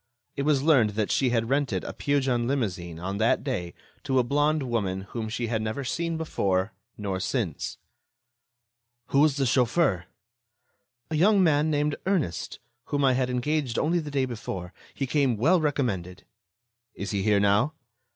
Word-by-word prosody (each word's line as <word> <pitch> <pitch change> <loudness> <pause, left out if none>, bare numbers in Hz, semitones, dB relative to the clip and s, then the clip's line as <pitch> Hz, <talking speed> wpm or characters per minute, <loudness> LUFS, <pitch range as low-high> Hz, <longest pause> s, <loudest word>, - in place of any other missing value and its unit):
It - - -2
was 140 -1 +2
learned 135 -9 +4
that 105 -2 0
she 130 - +2
had 115 -2 0
rented 135 -10 0
a - - -6
Peugeon 130 -4 0
limousine 95 -11 -2
on 95 +3 -4
that 110 - +2
day 95 - -3 0.3
to 130 - 0
a 125 - +5
blonde 145 +4 +1
woman 100 -7 -1
whom 110 +3 -5
she 120 +2 -2
had 115 -1 -1
never 110 +6 -3
seen 165 +5 -2
before 100 -11 -1 0.2
nor 100 -3 -3
since. - - -2 1.3
"Who 140 - +3
was 150 -1 +4
the 135 - +1
chauffeur?" 120 - +2 1.1
"A - - 0
young 195 +4 +4
man 155 -2 +3
named 150 -1 0
Ernest, 175 - -1 0.3
whom 145 -1 0
I 130 - +4
had 125 0 0
engaged 125 0 -1
only 170 +3 +2
the 150 -3 -5
day 140 -2 0
before. 95 -7 -6 0.2
He 135 - -1
came 135 -3 +1
well 165 - +3
recommended." 110 - -2 0.7
"Is 100 - -5
he 100 -2 -1
here 105 0 +3
now?" 100 +9 +3
125 Hz, 165 wpm, -26 LUFS, 105-145 Hz, 1.3 s, a